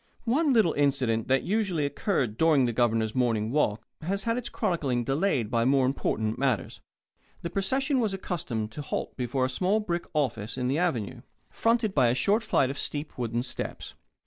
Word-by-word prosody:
One 285 +6 +2
little 220 -10 +4
incident 135 -6 +1
that 135 0 +2
usually 190 -6 0
occurred 140 - -1
during 150 -1 +4
the 120 - -1
Governor's 110 -2 +1
morning 115 -3 +1
walk 110 -7 +1 0.2
has 195 +5 -2
had 230 +1 0
its 245 -1 -4
chronicling 135 -9 -1
delayed 135 - 0
by 115 -1 +2
more 135 +1 +3
important 110 -4 -1
matters. 130 -8 -1 0.6
The 170 - -4
procession 265 +8 0
was 220 -4 +1
accustomed 150 - -3
to 150 - -6
halt 145 - -4
before 130 +1 -1
a - - +1
small 185 +11 +1
brick 175 -5 -2
office 125 -6 -1
on 125 0 -1
the 140 +4 +1
Avenue, 135 - -1 0.3
fronted 230 -3 +1
by 130 -7 +4
a 120 - +2
short 205 - +2
flight 135 -11 +1
of 140 - -7
steep 150 +1 -4
wooden 120 -1 -2
steps. 130 - -5
140 Hz, 180 wpm, -27 LUFS, 120-195 Hz, 0.6 s, little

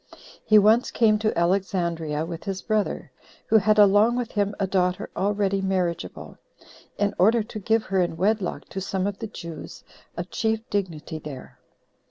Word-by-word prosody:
He 215 - +5
once 215 +4 +5
came 215 -2 +3
to 215 -4 -1
Alexandria 170 -4 0
with 165 -1 -7
his 195 -1 -4
brother, 215 -2 -1 0.3
who 220 - +4
had 215 +2 +2
along 210 +3 +5
with 245 -2 -3
him 205 -1 -1
a 195 - +1
daughter 185 -1 0
already 200 -1 0
marriageable, 185 -3 -3 0.6
in 205 0 0
order 220 +5 +4
to 215 0 -8
give 220 +2 +1
her 190 -1 0
in 175 -2 -1
wedlock 200 +1 0
to 190 - -5
some 190 0 -2
of 200 -1 -3
the 225 - -4
Jews 170 -6 -9 0.3
of - - -5
chief 220 0 -1
dignity 170 -5 -3
there. 145 -4 -10
195 Hz, 165 wpm, -24 LUFS, 180-215 Hz, 0.6 s, He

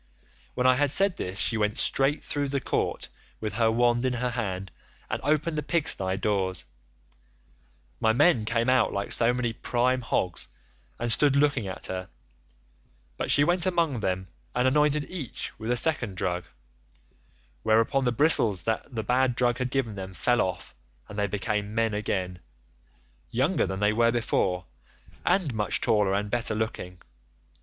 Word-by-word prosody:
"When 125 - 0
I 130 0 +5
had 145 +1 +2
said 195 +5 +2
this 90 +1 -5
she 115 - 0
went 105 0 0
straight 135 +2 +1
through 145 -1 -2
the 140 0 0
court - - -2 0.3
with 110 -1 -4
her 115 -1 +2
wand 120 +1 +2
in 130 -1 +1
her 125 0 -1
hand 95 -6 -4 0.4
and - - -2
opened 155 +2 +1
the - - -1
pigstye 100 - +1
doors. 95 -4 -1 1.3
My 110 - +3
men 120 -1 +3
came 115 +2 0
out 130 -2 +3
like 100 0 -3
so 115 0 +5
many 125 -2 -1
prime 125 +3 0
hogs 95 -6 -2 0.5
and 120 0 -1
stood 140 +2 +3
looking 140 -7 +2
at 95 - -6
her, 95 0 -5 1.1
but - - -3
she 145 - +6
went 175 +3 +2
about 185 - +1
among 165 -8 +1
them 95 -2 -2 0.3
and 125 +1 +2
anointed 150 +2 +3
each 160 -10 -5
with 110 +1 -5
a 125 - +2
second 120 - +1
drug, 90 -1 -2 1.2
whereon 115 +5 +2
the 125 - +2
bristles 115 - +3
that 115 +3 -3
the 110 - -2
bad 125 +1 +2
drug 120 0 +1
had 125 0 -1
given 125 -4 -1
them 95 -1 -7
fell 120 +8 +2
off, 90 -2 -3 0.4
and 105 - -6
they 100 - +1
became 105 +1 -2
men 115 -1 +1
again, 95 -3 -2 0.9
younger - - +1
than 95 0 -4
they 105 +1 +3
were 115 +1 +3
before, 95 -6 0 0.6
and 175 -10 +1
much 105 -2 -1
taller 105 -3 +2
and 105 +1 -2
better 115 -2 0
looking. 90 -5 -4
115 Hz, 165 wpm, -27 LUFS, 105-130 Hz, 1.3 s, she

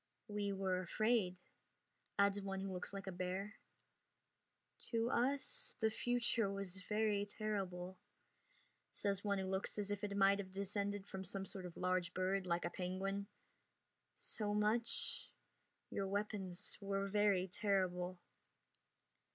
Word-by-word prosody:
"We 205 -1 0
were 190 -2 +1
afraid," 215 0 +2 0.8
adds 200 0 +4
one 195 -1 -2
who 195 0 -2
looks 180 - -3
like 195 0 -5
a 190 - -3
bear. 185 +4 -3 1.3
"To 230 +1 +2
us 270 +4 +1
the 220 -1 +3
future 235 -2 +2
was 195 -1 -3
very 210 0 +2
terrible," 190 -4 -3 0.9
says 200 -1 0
one 200 -1 +2
who 190 - -1
looks 190 +2 0
as 205 -1 -1
if 205 0 -2
it 200 -1 -1
might 200 0 +6
have 190 -2 -4
descended 200 0 -1
from 190 -1 -5
some 195 +1 -2
sort 190 -1 -4
of 175 - -11
large 180 -1 +1
bird 185 +1 +1
like 170 0 +1
a - - -1
penguin. 195 +3 -2 0.9
"So 210 -1 -2
much 220 +3 +1 0.6
Your 195 - 0
weapons 200 -2 -1
were 195 0 0
very 200 -2 +3
terrible." 185 -2 +1
195 Hz, 135 wpm, -40 LUFS, 185-205 Hz, 1.3 s, might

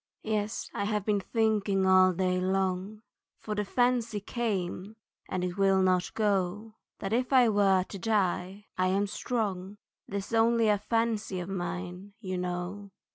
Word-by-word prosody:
Yes, 215 0 -2
I 200 - -2
have 210 -1 -1
been 210 -2 +2
thinking 210 -2 +1
all 185 0 +6
day 185 0 0
long, 190 +2 -1 0.3
For 215 - -5
the 210 0 -1
fancy 235 0 +1
came 200 -2 -3 0.3
and 185 -1 -2
it 180 +1 -3
will 195 -1 +4
not 185 -1 +2
go, 205 0 0 0.2
That 195 +2 -4
if 250 +3 0
I 255 -3 +6
were 195 -3 +3
to 195 +1 -9
die 195 -1 -1
I 185 - +3
am 195 +2 +2
strong, 205 -3 -3 0.3
'Tis 200 +2 -4
only 230 0 +4
a 205 -1 +3
fancy 225 -3 -1
of 175 +1 -5
mine, 180 +1 -5
you 185 -4 -4
know. 180 +3 -4
200 Hz, 155 wpm, -29 LUFS, 185-215 Hz, 0.3 s, all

